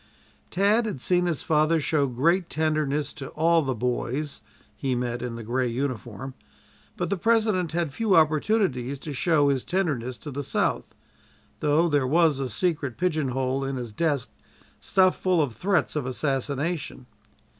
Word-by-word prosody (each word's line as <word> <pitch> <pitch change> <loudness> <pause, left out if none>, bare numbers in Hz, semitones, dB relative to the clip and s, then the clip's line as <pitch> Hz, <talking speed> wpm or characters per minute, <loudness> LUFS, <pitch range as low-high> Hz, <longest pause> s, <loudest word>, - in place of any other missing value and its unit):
Tad 210 +5 +2
had 200 -11 -4
seen 180 +6 +2
his 165 -5 -1
father 155 +1 +2
show 145 -1 +1
great 170 +9 +1
tenderness 150 -2 0
to 135 - -7
all 165 +1 +2
the 135 -4 -2
"boys" 125 +5 -2 0.3
he 130 +4 -1
met 120 0 -2
in 120 -1 -4
the 115 - -7
gray 125 +3 0
uniform, 125 -1 -4 0.6
but - - -2
the 200 - +1
President 215 -5 +1
had 165 -4 -1
few 210 +3 +2
opportunities 155 - +2
to 145 +2 -7
show 145 0 +3
his 135 -3 0
tenderness 140 -10 -1
to 150 - -8
the 140 +2 -4
South 140 - -1 0.6
though 155 +3 +3
there 145 -5 +1
was 160 -1 +3
a 135 -2 -2
secret 140 - -1
pigeonhole 135 -6 0
in 135 0 -3
his 120 -3 -5
desk 145 -1 0 0.5
stuffed 185 -1 +2
full 185 -2 +2
of 140 -6 +1
threats 185 - 0
of 145 -4 -2
assassination. 140 +2 -2
145 Hz, 155 wpm, -25 LUFS, 130-170 Hz, 0.6 s, show